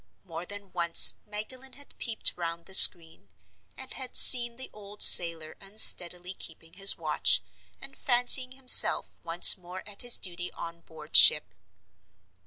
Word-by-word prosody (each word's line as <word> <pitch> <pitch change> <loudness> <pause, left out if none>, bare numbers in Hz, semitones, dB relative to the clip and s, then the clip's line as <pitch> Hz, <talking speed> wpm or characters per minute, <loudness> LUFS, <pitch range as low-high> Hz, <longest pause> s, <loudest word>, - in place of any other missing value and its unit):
More 170 -1 -14
than 205 -2 -15
once 170 -2 +2
Magdalen 255 +6 -11
had 285 +1 -18
peeped 230 -3 -4
round 170 -1 -11
the 190 - -14
screen, 160 - +2 0.5
and 265 0 -14
had 260 -2 -7
seen 240 -2 +4
the 260 +2 -15
old 205 0 -5
sailor 165 -2 +3
unsteadily 180 -3 -1
keeping 165 -2 -16
his 195 +2 0
watch, - - -4 0.4
and 275 0 -17
fancying 255 0 -2
himself 260 -1 +1
once 170 +4 +2
more 180 +1 -15
at 205 -1 -10
his 245 -1 -1
duty 175 -1 -11
on 170 0 -14
board 160 -2 -12
ship. - - +2
190 Hz, 145 wpm, -23 LUFS, 170-240 Hz, 0.5 s, seen